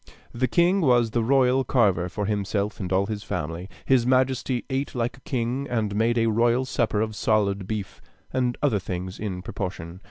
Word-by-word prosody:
The 130 +2 0
king 175 +8 +3
was 120 -6 +3
the 120 - +1
royal 130 +2 +3
carver 100 -9 +2
for 105 +4 -3
himself 100 0 -1
and 95 -3 -4
all 95 +1 +3
his 105 0 -4
family. 85 +3 -4 0.2
His 130 -3 +4
majesty 130 0 +1
ate 135 0 -3
like 120 0 -2
a - - -19
king, 125 +2 -2
and 110 -4 -1
made 115 +2 +2
a 115 - +3
royal 120 +3 +2
supper 115 -4 0
of 110 -1 -2
solid 100 -3 +1
beef, 105 -3 -5 0.3
and 125 -2 0
other 130 -8 +3
things 90 0 -5
in 95 -4 -4
proportion. 90 -2 -5
115 Hz, 185 wpm, -25 LUFS, 100-125 Hz, 0.3 s, His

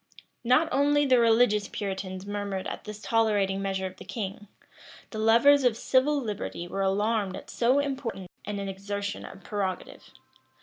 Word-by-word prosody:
Not 255 +7 +4
only 290 +2 +3
the 255 -2 +5
religious 225 -3 +4
Puritans 190 -1 -5
murmured 200 -2 -3
at - - -6
this 210 0 -7
tolerating 205 -4 +1
measure 190 -1 -2
of 185 0 -6
the - - -10
king; 210 -1 -6 0.6
the 215 - -5
lovers 235 +6 +5
of 240 -3 +3
civil 270 +4 +2
liberty 210 -7 -4
were 195 +2 -3
alarmed 200 0 +1
at - - -9
so 245 +3 +2
important 265 -9 -2 0.2
an 210 0 -4
exertion 200 +1 -4
of 195 - -11
prerogative. 195 -3 -4
210 Hz, 150 wpm, -27 LUFS, 195-245 Hz, 0.6 s, the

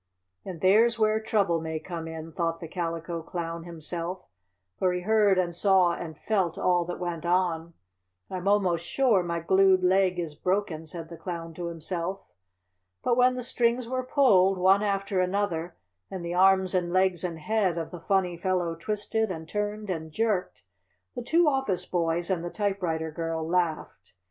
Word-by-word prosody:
"And 180 -4 -8
there's 225 +5 +4
where 215 0 +2
trouble 200 -7 +1
may 160 0 -3
come 165 -1 -6
in," 160 0 -7
thought 165 0 -2
the 165 - -7
Calico 165 0 -4
Clown 165 0 -5
himself, 170 +2 -5 0.5
for 185 -1 +2
he 180 - -2
heard 210 -1 +3
and 175 -2 0
saw 185 -1 +4
and 160 -3 -7
felt 190 -5 0
all 175 -1 +2
that 175 - -5
went 175 -2 -4
on. 170 -2 0 0.5
"I'm 185 0 -5
almost 185 -5 +2
sure 235 -1 +2
my 170 -1 -2
glued 190 +1 +4
leg 185 0 +3
is 165 -4 -3
broken," 175 -1 -2
said 165 0 -7
the 170 - -9
Clown 165 -2 -6
to 175 +1 -5
himself. 170 +3 -4 0.8
But 240 - +2
when 250 +1 +4
the 250 - -4
strings 240 0 +1
were 255 +1 -1
pulled, 205 -8 +4
one 190 +2 +4
after 195 -2 0
another, 180 -3 -1 0.3
and 185 -3 -6
the 170 - -3
arms 190 0 +4
and 175 -2 0
legs 185 -1 +2
and 170 -2 -3
head 190 +1 0
of 165 -1 -4
the 175 -2 -8
funny 185 -2 0
fellow 180 -2 0
twisted 210 +5 -2
and 160 -3 -6
turned 210 +1 -3
and 160 -2 -5
jerked, 205 - -1 0.5
the - - -3
two 325 +7 +3
office 265 -11 0
boys 170 0 0
and 175 -3 -1
the 175 - -3
typewriter 175 -6 -2
girl 165 0 -3
laughed. 170 - -2
180 Hz, 175 wpm, -27 LUFS, 165-200 Hz, 0.8 s, there's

